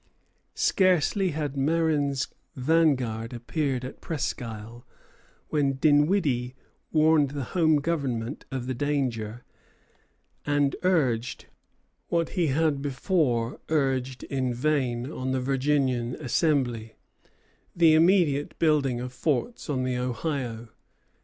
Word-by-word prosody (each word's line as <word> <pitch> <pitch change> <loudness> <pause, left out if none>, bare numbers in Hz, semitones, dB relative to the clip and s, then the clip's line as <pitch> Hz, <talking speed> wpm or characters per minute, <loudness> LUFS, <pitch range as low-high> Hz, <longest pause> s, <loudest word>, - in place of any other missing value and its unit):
Scarcely 185 +1 +2
had 145 -3 -3
Marin's 145 -2 +1 0.3
vanguard 130 -6 +1
appeared 130 +1 -2
at 130 - -9
Presquisle, 120 -6 -5 0.7
when 140 -3 +1
Dinwiddie 145 -3 +2 0.4
warned 155 -2 +4
the 140 0 -4
Home 160 -3 +4
Government 140 -5 -2
of 130 -2 -3
the 130 - -2
danger, 125 -4 -2 1.0
and 145 -1 +1
urged, 130 -10 0 0.6
what 170 -1 0
he 175 -4 0
had 145 0 +1
before 135 - 0
urged 135 -4 0
in 130 -3 -2
vain 130 -2 0
on 130 -3 -3
the 130 - 0
Virginian 130 -2 0
Assembly, 130 -6 0 0.8
the 165 -2 +5
immediate 160 -4 +3
building 145 -6 +2
of 125 +1 -6
forts 155 - -2
on 130 -3 0
the 130 -1 -1
Ohio. 125 -2 -3
140 Hz, 105 wpm, -26 LUFS, 125-155 Hz, 1.0 s, the